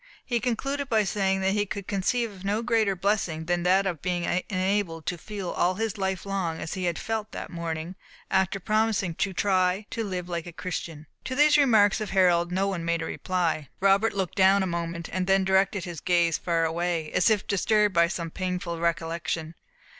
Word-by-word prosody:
He 240 Hz, -2 st, 0 dB
concluded 275 Hz, +4 st, -2 dB
by 220 Hz, -2 st, +3 dB
saying 195 Hz, -1 st, 0 dB
that 190 Hz, 0 st, +2 dB
he 205 Hz, +1 st, 0 dB
could 200 Hz, 0 st, -5 dB
conceive 225 Hz, +4 st, 0 dB
of 190 Hz, -2 st, -13 dB
no 205 Hz, +3 st, 0 dB
greater 225 Hz, -4 st, +2 dB
blessing 180 Hz, -4 st, -1 dB
than 175 Hz, 0 st, 0 dB
that 185 Hz, +3 st, +3 dB
of 175 Hz, -6 st, -2 dB
being 175 Hz, -1 st, -1 dB, 0.3 s
enabled 185 Hz, -4 st, -1 dB
to 180 Hz, -, -1 dB
feel 195 Hz, +1 st, -6 dB
all 180 Hz, +1 st, +1 dB
his 220 Hz, 0 st, -2 dB
life 190 Hz, -2 st, -2 dB
long 185 Hz, -5 st, -2 dB
as 160 Hz, -, -5 dB
he 185 Hz, -2 st, 0 dB
felt 220 Hz, +4 st, -4 dB
that -, -, -6 dB
morning, 170 Hz, 0 st, -4 dB, 0.4 s
after 190 Hz, +1 st, +1 dB
promising 215 Hz, -2 st, +1 dB
to 195 Hz, +4 st, -1 dB
try 185 Hz, +1 st, +1 dB
to 230 Hz, -, -2 dB
live 180 Hz, -4 st, -4 dB
like 170 Hz, -1 st, -4 dB
a 175 Hz, -, -8 dB
Christian. 165 Hz, -2 st, -5 dB, 0.2 s
To 260 Hz, -, -3 dB
these 295 Hz, +2 st, +5 dB
remarks 220 Hz, -7 st, +4 dB
of 210 Hz, -, -3 dB
Harold 175 Hz, -2 st, +3 dB
no 190 Hz, +2 st, +1 dB
one 185 Hz, -4 st, -2 dB
made 170 Hz, 0 st, 0 dB
reply. 170 Hz, -6 st, -2 dB
Robert 195 Hz, +3 st, +3 dB
looked 190 Hz, -1 st, -2 dB
down 195 Hz, +1 st, +5 dB
a -, -, 0 dB
moment, 170 Hz, -1 st, -3 dB
then 190 Hz, +1 st, +2 dB
directed 190 Hz, 0 st, +2 dB
his 175 Hz, -3 st, -6 dB
gaze 170 Hz, -2 st, +2 dB
far 165 Hz, -1 st, +1 dB
away, 165 Hz, -1 st, -1 dB
as 180 Hz, -, +3 dB
if 210 Hz, -2 st, +1 dB
disturbed 210 Hz, +1 st, +2 dB
by 170 Hz, -1 st, +4 dB
some 170 Hz, -2 st, -4 dB
painful 180 Hz, -2 st, -3 dB
recollection. 165 Hz, -1 st, -2 dB
185 Hz, 190 wpm, -26 LUFS, 170-205 Hz, 0.4 s, these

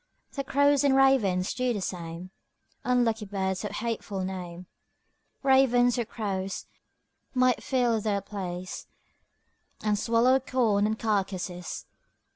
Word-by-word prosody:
The 275 Hz, -, -3 dB
crows 285 Hz, +1 st, +3 dB
and 275 Hz, -2 st, +4 dB
ravens 215 Hz, -9 st, +3 dB
do 250 Hz, -1 st, 0 dB
the 210 Hz, -, -2 dB
same, 175 Hz, -1 st, -5 dB, 0.5 s
Unlucky 235 Hz, -3 st, +1 dB
birds 190 Hz, -1 st, -2 dB
of 210 Hz, -, -2 dB
hateful 210 Hz, -2 st, -3 dB
name; 180 Hz, -1 st, -6 dB, 0.8 s
Ravens 245 Hz, -3 st, +4 dB
or 235 Hz, -, 0 dB
crows 195 Hz, -4 st, -4 dB, 0.7 s
might 255 Hz, -1 st, +3 dB
fill 245 Hz, -4 st, +1 dB
their 205 Hz, -1 st, 0 dB
place, 185 Hz, -2 st, -6 dB, 1.0 s
And 210 Hz, -1 st, +1 dB
swallow 240 Hz, +4 st, +3 dB
corn 230 Hz, -6 st, +1 dB
and 220 Hz, 0 st, -1 dB
carcases. 190 Hz, -5 st, -2 dB
215 Hz, 115 wpm, -28 LUFS, 190-250 Hz, 1.0 s, and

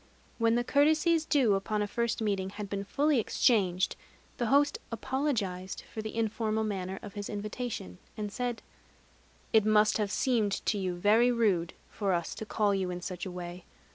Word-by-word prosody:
When 230 Hz, 0 st, +3 dB
the 240 Hz, -, +2 dB
courtesies 310 Hz, +4 st, +3 dB
due 260 Hz, -10 st, +3 dB
upon 210 Hz, +2 st, 0 dB
a -, -, -2 dB
first 235 Hz, +1 st, -1 dB
meeting 195 Hz, -3 st, 0 dB
had 205 Hz, 0 st, -7 dB
been 200 Hz, -1 st, -2 dB
fully 290 Hz, +5 st, +2 dB
exchanged, 195 Hz, -5 st, +2 dB, 0.4 s
the 240 Hz, -, 0 dB
host 285 Hz, +3 st, +3 dB
apologized 220 Hz, -7 st, -2 dB
for 220 Hz, -, -3 dB
the 220 Hz, 0 st, -6 dB
informal 220 Hz, 0 st, 0 dB
manner 190 Hz, -3 st, -3 dB
of 205 Hz, -, -8 dB
his 205 Hz, -2 st, -5 dB
invitation, 210 Hz, -, -5 dB, 0.2 s
and 210 Hz, -1 st, -3 dB
said: 245 Hz, +1 st, -3 dB, 0.9 s
"It 220 Hz, -2 st, +6 dB
must 215 Hz, 0 st, +4 dB
have 210 Hz, -1 st, 0 dB
seemed 220 Hz, -4 st, +1 dB
to 210 Hz, -, +1 dB
you 185 Hz, -2 st, -2 dB
very 220 Hz, +7 st, +4 dB
rude 200 Hz, -8 st, +1 dB, 0.2 s
of 205 Hz, -, -1 dB
us 175 Hz, -3 st, 0 dB
to 220 Hz, -, -7 dB
call 210 Hz, -2 st, +1 dB
you 190 Hz, -2 st, -1 dB
in 180 Hz, 0 st, -4 dB
such 180 Hz, +1 st, -5 dB
a -, -, -6 dB
way. 175 Hz, 0 st, -7 dB
210 Hz, 175 wpm, -30 LUFS, 195-235 Hz, 0.9 s, It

